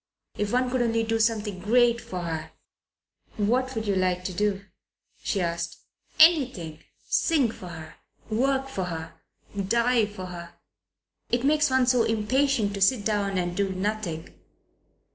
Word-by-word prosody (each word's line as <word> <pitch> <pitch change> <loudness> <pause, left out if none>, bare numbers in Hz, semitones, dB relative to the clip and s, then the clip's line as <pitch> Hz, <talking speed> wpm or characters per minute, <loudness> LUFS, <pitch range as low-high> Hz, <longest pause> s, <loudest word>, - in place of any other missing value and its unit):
"If 205 0 -2
one 250 0 +1
could 255 -1 +1
only 230 -1 +1
do 225 0 0
something 215 -4 0
great 235 +4 +3
for 180 -1 -6
her!" 160 -2 -5 0.8
"What 250 +5 +1
would 220 0 -2
you 200 -2 +1
like 185 -1 +1
to 185 - -4
do?" 200 +1 -1 0.6
she 200 - -1
asked. 170 -1 -2 0.4
"Anything. 260 - +4 0.3
Sing 285 -9 +2
for 185 - -10
her. 160 -2 -9 0.3
Work 270 +4 +1
for 195 -9 -3
her. 165 -2 -6 0.4
Die 230 +3 +2
for 200 -3 -8
her. 170 -1 -9 0.7
It 240 +1 0
makes 300 0 +3
one 260 -1 +3
so 250 -1 +3
impatient 225 0 +1
to 200 - -5
sit 205 +1 +3
down 200 -3 0
and 175 -1 -1
do 200 0 0
nothing. 190 -4 -3
210 Hz, 150 wpm, -26 LUFS, 185-245 Hz, 0.8 s, Anything